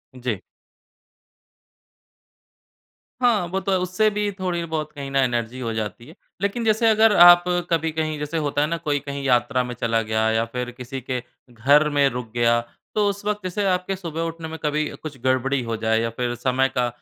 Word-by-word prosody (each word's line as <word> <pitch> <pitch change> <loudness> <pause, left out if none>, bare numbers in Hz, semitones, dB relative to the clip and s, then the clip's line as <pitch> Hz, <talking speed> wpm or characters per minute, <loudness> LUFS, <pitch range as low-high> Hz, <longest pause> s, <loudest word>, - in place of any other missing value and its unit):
जी। 120 -5 -3 2.8
हाँ, 230 -7 +3
वो 190 +3 -2
तो 195 - -3
है। 190 - +3
उससे 185 +4 +1
भी 210 0 -1
थोड़ी 180 -2 -1
बहुत 155 -2 -3
कहीं 140 -2 -7
ना 135 - +2
एनर्जी 120 0 -2
हो 115 -3 -3
जाती 110 +2 -4
है। 160 - -14 0.3
लेकिन 200 +4 -1
जैसे 220 +1 +3
अगर 220 -1 +5
आप 175 0 +9 0.3
कभी 165 -1 +1
कहीं, 155 -1 -2
जैसे 150 +3 -3
होता 145 -1 0
है 150 - +2
ना, 170 +2 -2
कोई 150 -3 -1
कहीं 140 0 -6
यात्रा 125 0 +2
में 125 0 -5
चला 115 -1 0
गया 110 0 0
या 115 +1 +1
फिर 125 +1 -5
किसी 125 +2 -7
के 125 0 -3 0.3
घर 140 +6 +4
में 145 -1 +3
रुक 125 -3 -6
गया, 120 0 +3 0.4
तो 210 -1 +3
उस 200 0 -5
वक़्त 210 -2 -2
इसे 190 +3 -1
आपके 185 +1 0
सुबह 165 -4 -5
उठने 165 0 -4
में 160 0 -7
कभी 150 0 0
कुछ 150 -4 -7
गड़बड़ी 130 +1 +1
हो 115 -1 -3
जाए 110 0 +1
या 115 - -1
फिर 120 -1 -1
समय 130 +2 +1
का 125 -1 +2
145 Hz, 195 wpm, -23 LUFS, 125-175 Hz, 2.8 s, आप